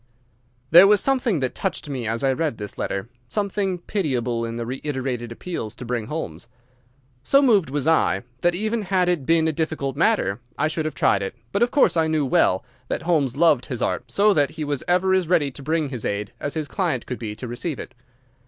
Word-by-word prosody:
There 175 +4 +9
was 205 0 +5
something 250 - +1
that 130 - -1
touched 190 -5 -3
me 130 -5 -4
as 115 +3 -2
I 135 -1 +3
read 150 -3 -1
this 105 -1 -7
letter, 100 +2 -3 0.2
something 200 -2 -1
pitiable 125 - -1
in 115 0 -5
the 120 0 -3
reiterated 130 -2 -3
appeals 115 -4 -5
to 125 - -8
bring 120 -2 -2
Holmes. 120 - -5 0.7
So 275 - +4
moved 215 - +4
was 145 0 -1
I 160 -11 +3 0.2
that 175 +3 +2
even 215 +4 -1
had 185 -2 +1
it 165 -7 -1
been 165 -1 +3
a - - +2
difficult 155 -4 -2
matter 145 - +1 0.2
I 155 - +2
should 155 0 -2
have 155 - -3
tried 100 - +2
it, 95 - -4 0.2
but - - -1
of 240 - +4
course 220 -12 +3
I 160 -1 +2
knew 155 -2 +1
well 95 -6 +2 0.2
that - - -3
Holmes 145 -7 +1
loved 150 -6 +4
his 125 -4 -3
art, 125 -1 -2
so 205 +6 +4
that 145 -4 +2
he 160 -1 -6
was 145 -2 -2
ever 185 +2 +3
as 185 -3 +2
ready 150 -5 +2
to 140 - -11
bring 155 +1 0
his 125 -5 -5
aid 100 0 -3
as 145 - -3
his 155 -2 -2
client 170 - -1
could 125 - -5
be 110 -3 -5
to 125 - -6
receive 120 +5 -4
it. - - -8
150 Hz, 220 wpm, -23 LUFS, 125-175 Hz, 0.7 s, There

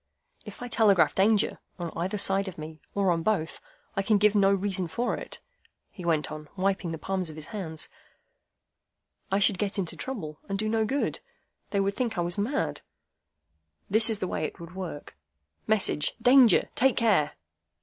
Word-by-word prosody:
"If - - -8
I - - -4
telegraph 215 -7 +4
Danger, 205 +2 +3 0.2
on 170 -3 -4
either 185 +5 -2
side 195 0 +2
of 185 - -7
me, 155 0 -9
or 195 -2 +2
on 165 -1 0
both, 175 -4 -1 0.3
I 195 - +1
can 210 +2 +3
give 210 +1 +4
no 200 -2 +4
reason 195 -2 0
for 235 +10 -1
it," - - -8 0.5
he 180 - -10
went 160 -3 0
on, 155 0 -8
wiping 190 -2 0
the 165 - -4
palms 185 0 -2
of 155 - -9
his 155 -1 -5
hands. 165 -7 -3 1.4
"I 195 - +3
should 200 -2 +3
get 205 -1 -2
into 185 -4 -2
trouble, 160 - -6
and 195 - -1
do 215 +2 -1
no 220 0 +1
good. 275 +6 -1 0.5
They 200 - 0
would 195 0 0
think 235 -6 -2
I - - +1
was 175 0 -1
mad. 205 - -1 1.1
This 220 +2 +6
is 220 - +2
the 185 - -3
way 155 - -3
it - - -4
would 170 +1 -10
work,—Message: 145 - -3
'Danger! 250 -5 +6
Take 265 0 +3
care! 190 -11 +3
195 Hz, 180 wpm, -27 LUFS, 165-215 Hz, 1.4 s, This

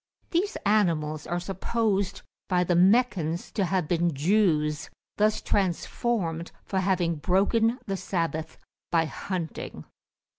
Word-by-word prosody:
These 380 +5 0
animals 165 -8 +1
are 175 +1 -1
supposed 195 +2 -1 0.3
by 180 -2 +3
the 180 - +1
Meccans 185 -4 +3
to 200 - 0
have 180 -3 0
been 170 -2 +1
Jews, 150 -3 +2 0.3
thus 215 +1 +2
transformed 180 -2 -1
for 190 - -1
having 180 -3 +1
broken 205 +8 +2
the 195 -3 -2
Sabbath 165 -4 -2 0.3
by 165 -1 +3
hunting. 170 0 -5
180 Hz, 115 wpm, -27 LUFS, 165-205 Hz, 0.3 s, by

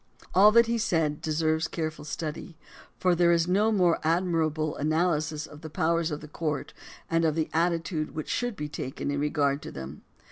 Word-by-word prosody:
All 205 +3 +7
that 235 +1 +7
he 230 0 -1
said 160 -8 0
deserves 160 +1 0
careful 155 -2 -4
study, 160 +1 -5 0.4
for 180 -1 +2
there 170 0 +4
is 170 0 +2
no 205 +5 +3
more 180 -5 +3
admirable 160 -2 0
analysis 155 0 0
of 150 - -13
the 160 - -7
powers 165 +2 +1
of 150 -1 -4
the 150 - -9
courts 150 -1 -3 0.3
and 165 0 +1
of 155 -2 +2
the 160 -1 -1
attitude 165 -1 0
which 155 - -4
should 245 -2 -1
be 150 -6 -4
taken 140 -1 -4
in 140 - -1
regard 145 -1 +1
to - - -8
them. 70 +2 -8
160 Hz, 185 wpm, -27 LUFS, 150-175 Hz, 0.4 s, All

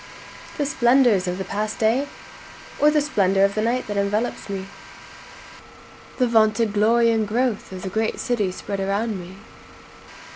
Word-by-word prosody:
The 290 - 0
splendors 240 -8 +3
of 180 0 -2
the 190 - -3
past 215 +1 -3
day? 235 +6 +1 0.7
Or 295 - +5
the 300 0 +2
splendor 195 -9 +2
of 200 - -1
the 215 - -1
night 240 +3 0
that 205 -1 -4
envelopes 205 +3 -1
me? 195 -1 -3
Or 195 - -17
the 250 - +2
vaunted 220 -1 +2
glory 230 +3 +3
and 220 -2 0
growth 235 -1 -1
of 185 -1 -8
the 190 - -3
great 220 +3 -2
city 225 -7 -1
spread 200 +2 -5
around 200 +2 -1
me? 180 +1 -10
215 Hz, 160 wpm, -22 LUFS, 200-235 Hz, 0.7 s, Or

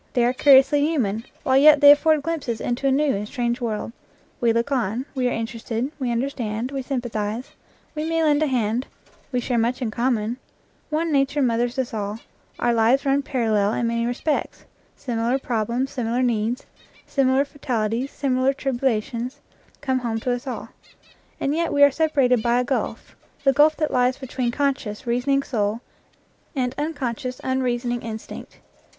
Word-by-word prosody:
They 240 -1 +3
are 245 - +2
curiously 275 +2 +6
human, 235 -9 0 0.2
while 260 0 +3
yet 295 +1 +7
they 285 0 +9
afford 305 0 +4
glimpses 290 -8 -3
into 245 +3 -1
a - - +3
new 285 +1 +2
and 205 +1 -4
strange 240 0 -2
world. 225 -2 -3 0.5
We 235 -1 +3
look 235 +4 0
on; 245 -1 -1
we 255 -3 0
are - - 0
interested; 230 +3 -3
we 255 -3 -1
understand; 235 -1 -2
we 275 -1 -3
sympathize; 240 -3 -3 0.4
we 310 +1 -3
may 330 0 +1
lend 300 -1 +3
a 310 - +3
hand; 240 -1 0 0.4
we 250 - 0
share 245 -1 0
much 235 +2 0
in 240 -4 -2
common; 235 -1 0 0.5
one 320 +1 -1
nature 280 0 +2
mothers 240 0 0
us 260 -3 -2
all; 205 -1 -3 0.4
our 240 0 +1
lives 235 +5 +3
run 275 +1 +2
parallel 220 -6 +1
in 235 - -1
many 230 0 0
respects; 275 +5 -2 0.3
similar 240 0 -1
problems, 245 +1 -2
similar 245 0 -1
needs, 235 0 0 0.4
similar 270 0 +2
fatalities, 250 -3 -2
similar 265 -1 +1
tribulations, 250 -2 -2 0.4
come 260 -2 0
home 230 -2 -2
to 250 - -1
us 245 +3 -3
all; 255 - -5 0.7
and 275 - 0
yet 335 +1 0
we 285 - +4
are 285 - +7
separated 270 -6 +2
by 235 +2 +2
a - - +1
gulf, 260 +2 -3 0.3
the 275 -1 +4
gulf 300 +3 +4
that 310 -1 -1
lies 250 +1 +2
between 255 -2 -3
conscious, 260 -5 -2
reasoning 255 +4 +1
soul 215 -3 -1 0.8
and 250 -2 -1
unconscious, 255 -5 -3
unreasoning 245 -2 -1
instinct. 220 -1 -8
250 Hz, 165 wpm, -23 LUFS, 235-275 Hz, 0.8 s, they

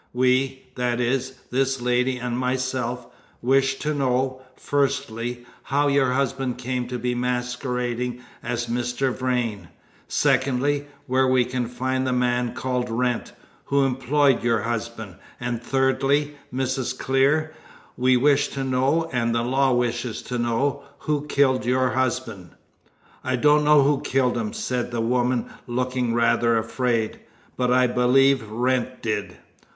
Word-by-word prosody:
We 130 +1 +1
that 125 -1 -1
is, 130 +2 0 0.2
this 135 +1 +1
lady 125 +1 +1
and 125 -1 -3
myself 125 -1 -2 0.3
wish 135 +2 +2
to 150 +2 -2
know, 130 -1 0
firstly, 120 -4 -2 0.2
how 145 +1 +1
your 135 -2 +2
husband 135 -2 -1
came 125 0 -3
to 125 0 -4
be 125 +1 -1
masquerading 125 0 -2 0.2
as 120 0 -2
Mr. 125 +2 -1
Vrain; 125 -5 -2 0.4
secondly, 140 +2 +1 0.2
where 130 -1 +2
we 130 -1 +3
can 125 -1 -2
find 130 +2 -2
the 130 - +1
man 125 -1 0
called 125 -1 -2
Wrent, 120 +1 -1 0.3
who 140 0 +2
employed 135 0 +2
your 115 -2 +2
husband; 115 -4 -4 0.2
and 120 -1 -3
thirdly, 135 +3 +1 0.2
Mrs. 130 0 -2
Clear, 140 +4 +2 0.4
we 130 0 +3
wish 145 +2 +3
to 135 - -4
know, 135 +5 +1
and 115 -1 +1
the 115 - +1
law 135 +2 +2
wishes 120 -1 -1
to 125 -1 -4
know, 130 +5 0 0.2
who 150 -1 -1
killed 130 -4 +2
your 130 +1 +2
husband." 120 -8 -2 0.7
"I 130 - 0
don't 150 +4 +4
know 150 -1 +6
who 140 0 +2
killed 130 -1 +1
him," 215 - -2
said 130 - -2
the 120 -1 -3
woman, 120 +1 0 0.2
looking 125 -1 -1
rather 115 0 +3
afraid, 115 0 -1 0.4
"but 125 -1 0
I 125 0 +5
believe 125 0 +3
Wrent 125 +2 -1
did." 105 -3 -2
125 Hz, 140 wpm, -24 LUFS, 120-135 Hz, 0.7 s, know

